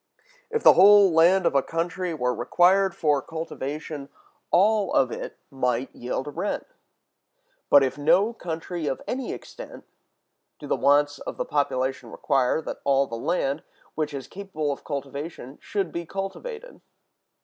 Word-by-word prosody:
If 455 -1 -2
the - - +9
whole 200 -1 +7
land 175 +3 +5
of - - +2
a 140 - +4
country 175 +4 -3
were 125 -6 -1
required 180 +8 +3
for 150 -3 +1
cultivation, 150 -2 -6 0.4
all 205 +2 +3
of 130 -3 +3
it - - -6
might 125 -1 -1
yield 125 +2 -4
a - - -5
rent. 205 - -3 1.0
But 140 -1 +7
in 135 +2 -3
no 190 +9 +4
country 165 -4 -5
of 135 - -2
any 260 0 -3
extent - - -10 0.7
do - - -10
the - - 0
wants 145 0 +3
of - - -7
the - - -2
population 130 -3 -1
require 135 +4 0
that - - -6
all 140 0 +3
the 115 - -12
land, 140 +3 -1 0.3
which 150 -2 -3
is 135 - -6
capable 185 -7 -4
of 140 - -6
cultivation, 140 -1 -6
should 200 -2 -2
be 170 -1 -5
cultivated. 445 - -6
155 Hz, 150 wpm, -25 LUFS, 140-185 Hz, 1.0 s, the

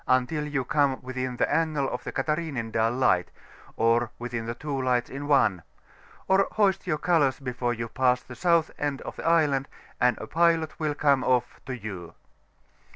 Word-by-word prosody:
until 130 +4 +1
you 140 -3 -2
come 140 0 +1
within 130 -1 -4
the - - +3
ansle 155 -4 0
of 125 - -5
the'Uatharinendiil 125 -7 -1
Light, 95 -9 +2 0.5
or 115 +1 +2
with 120 0 -6
the 115 0 -3
two 140 0 -3
lights 125 -1 0
in 140 +2 -5
one; 135 - +3 0.7
or 190 +1 +4
hoist 200 -4 +1
your 155 -4 +1
colours 150 -6 +2
before 125 -2 -2
you 115 0 -4
pass 125 +1 +1
the 125 - -11
south 170 +3 +2
end 145 -2 -1
of - - -7
the - - -4
island, 145 -5 +3 0.3
and 125 0 +3
a - - -6
pilot 165 -1 +1
will 155 -2 -1
come 140 -3 +3
ofi* 125 -1 0
to 130 -1 -4
you. 95 -6 -8
130 Hz, 170 wpm, -26 LUFS, 120-150 Hz, 0.7 s, or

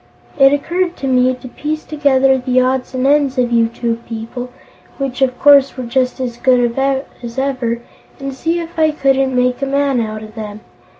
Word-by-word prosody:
It 270 0 +7
occurred 345 +5 -1
to 270 - -4
me 255 0 +3
to 255 - -11
piece 305 +5 -4
together 270 -3 +3
the 255 0 +1
odds 255 0 0
and 255 +1 0
ends 280 -1 +2
of 245 -1 +1
you 230 -1 +3
two 235 0 -2
people, 230 +2 -6 0.5
which 270 -2 -4
of 255 -1 +2
course 280 -2 +5
were 255 - -4
just 250 +2 -1
as 245 -2 -4
good 245 -2 +2 0.5
as 235 0 -8
ever, 255 -4 -1 0.4
and 275 0 -5
see 330 +6 -1
if 335 -1 -7
I 315 -1 +4
couldn't 270 -3 +1
make 250 +1 +1
a 275 - 0
man 275 -2 +1
out 215 -1 -4
of 215 0 -11
them. 215 -1 -7
260 Hz, 190 wpm, -16 LUFS, 245-275 Hz, 0.5 s, It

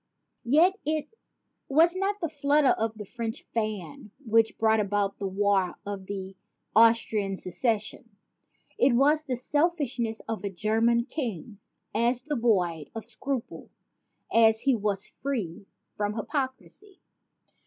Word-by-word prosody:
Yet 320 +9 +5
it 310 0 -1 0.6
was 330 +5 +4
not 395 +2 -1
the 335 - 0
flutter 290 -2 +3
of 220 0 -1
a 210 - -6
French 225 +1 -5
fan 210 -5 -4
which 225 0 +3
brought 220 0 +3
about 200 -1 -1
the 200 - -2
War 195 -1 +1
of 200 -2 -6
the 195 -1 -6 0.4
Austrian 220 -3 +4
Succession; 220 +5 -2 0.7
it 275 - +5
was 295 +5 +3
the 255 -3 -2
selfishness 265 -5 0
of 225 -3 -5
a 200 - -1
German 225 +5 +1
king, 225 - -5 0.3
as 235 +3 +1
devoid 200 - 0
of 225 +1 -6
scruple 265 +2 -5 0.6
as 225 -1 +5
he 270 -2 +3
was 205 -2 -1
free 205 -9 -4 0.3
from 205 0 -1
hypocrisy. 275 - -5
225 Hz, 125 wpm, -27 LUFS, 205-275 Hz, 0.7 s, Yet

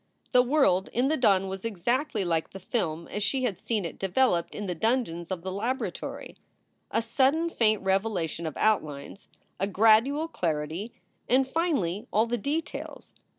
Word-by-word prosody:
The 250 - +6
world 250 -8 +2
in 250 +3 +2
the 315 - +2
dawn 195 -8 +3
was 190 0 -6
exactly 230 - -1
like 165 -2 0
the 195 - -9
film 170 -5 -2
as 210 - -3
she 260 +5 0
had 205 -7 -1
seen 215 -2 -1
it 165 - -7
developed 190 -2 +1
in 210 - -4
the 180 - -2
dungeons 175 -4 -1
of 185 -3 -4
the 190 - -4
laboratory, 235 +7 -4 0.5
a 225 - 0
sudden 280 +8 +2
faint 215 -6 +2
revelation 190 -4 0
of 155 - -6
outlines, 155 -5 -1 0.3
a 195 - +1
gradual 225 - +4
clarity, 165 - -3 0.4
and 260 +1 +4
finally 265 - -1
all 215 +2 +3
the 240 0 -2
details. 300 +3 -4
215 Hz, 160 wpm, -27 LUFS, 180-255 Hz, 0.5 s, The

